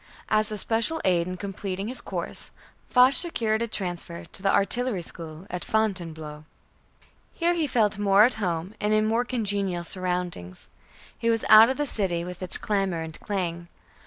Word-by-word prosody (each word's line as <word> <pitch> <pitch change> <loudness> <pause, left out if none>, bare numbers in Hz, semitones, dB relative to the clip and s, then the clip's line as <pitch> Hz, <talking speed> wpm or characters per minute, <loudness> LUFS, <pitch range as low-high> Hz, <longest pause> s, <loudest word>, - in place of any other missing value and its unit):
As 215 0 +2
a 215 - -3
special 230 +10 +1
aid 175 -2 +2
in 185 0 -5
completing 195 0 -5
his 255 +2 -2
course, - - -6 0.4
Foch 255 +1 +6
secured 230 -11 +2
a 235 - 0
transfer 175 -5 -4
to - - -3
the 195 0 +2
Artillery 215 -1 +1
School 165 +1 -6
at 180 0 -4
Fontainebleau. 165 -8 -2 0.9
Here 345 +1 +2
he 330 -3 0
felt 215 -5 +1
more 200 0 +5
at 245 - +4
home 175 +1 -2
and 210 +1 +1
in 215 0 +3
more 225 +2 +1
congenial 200 -7 -1
surroundings. 180 - -3 0.5
He 230 - -1
was 225 -1 +1
out 220 +2 +9
of 260 - -1
the 295 - 0
city 185 -9 -1
with 180 0 -8
its 185 - -2
clamor 195 -5 -1
and 160 -1 -8
clang. 175 -4 -3
200 Hz, 170 wpm, -26 LUFS, 175-220 Hz, 0.9 s, out